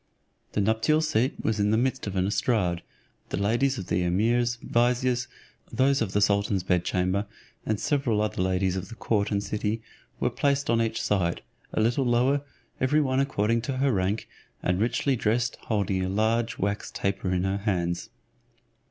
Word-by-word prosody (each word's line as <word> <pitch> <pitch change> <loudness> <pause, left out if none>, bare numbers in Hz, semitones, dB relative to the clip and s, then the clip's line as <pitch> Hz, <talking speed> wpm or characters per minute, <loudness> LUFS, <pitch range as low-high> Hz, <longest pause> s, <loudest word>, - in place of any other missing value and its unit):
The 105 - +1
nuptial 110 +9 +2
seat 140 -5 +1
was 110 -1 0
in 105 0 +2
the 110 - +3
midst 130 -1 0
of 100 - -4
an 95 0 +1
estrade. 95 -4 +1 0.5
The - - -2
ladies 120 +7 +1
of 95 - -5
the 90 - 0
emirs, 115 +7 +1
viziers, 125 +1 +1 0.4
those 135 +3 +2
of 100 -4 -1
the 105 - +2
sultan's 100 -2 +2
bed 90 -1 +1
chamber, 95 +3 0 0.4
and 110 -1 0
several 135 -7 +1
other 105 -3 -1
ladies 95 0 +1
of 95 +1 -4
the 115 - -9
court 105 -3 0
and 100 -1 0
city, 105 +1 -2 0.4
were - - +1
placed 140 -2 +1
on 115 0 +3
each 115 -1 -1
side, 90 -4 0 0.3
a - - -1
little 120 +5 +2
lower, 125 +4 +3 0.4
every 140 +4 +3
one 130 -3 +1
according 115 -4 +1
to 130 +3 -3
her 135 +1 +2
rank, 100 +1 0 0.4
and 90 0 +1
richly 125 +4 +1
dressed, 115 +1 0
holding 100 -4 0
a 95 - -1
large 115 +3 +1
wax 100 +2 -2
taper 95 -1 -2
in 90 0 +1
her 95 +1 0
hands. 90 -4 -1
110 Hz, 180 wpm, -27 LUFS, 95-120 Hz, 0.5 s, the